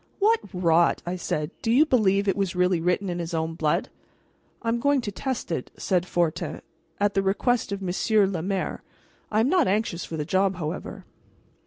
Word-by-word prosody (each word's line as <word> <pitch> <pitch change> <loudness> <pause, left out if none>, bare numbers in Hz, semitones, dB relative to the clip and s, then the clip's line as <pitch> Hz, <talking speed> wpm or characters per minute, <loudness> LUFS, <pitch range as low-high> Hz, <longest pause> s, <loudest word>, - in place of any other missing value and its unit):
"What 440 +3 +4
rot!" 170 -2 +2
I 175 +1 -2
said. 150 -4 -3
"Do - - -2
you 275 +6 +6
believe 205 -8 +2
it 195 - +2
was 195 -2 -1
really 180 -1 +2
written 180 +3 0
in 175 -1 -3
his 170 0 -3
own 160 0 -1
blood?" 155 -2 0 0.7
"I 230 - 0
am 235 +1 +1
going 285 +2 +3
to 210 - -4
test 255 0 -4
it," 145 -6 -3
said 180 -1 0
Fortin, 170 -2 -1 0.4
"at 205 0 +2
the 195 - +2
request 215 +4 +1
of 200 -1 -3
Monsieur 200 +3 +2
le 190 -4 -2
Maire. 190 +2 -2 0.5
I 215 0 +2
am 235 - +2
not 355 -5 +3
anxious 195 -4 0
for 160 - -6
the 150 - -2
job, 190 +3 +1
however." 155 -3 -5
190 Hz, 195 wpm, -25 LUFS, 175-220 Hz, 0.7 s, you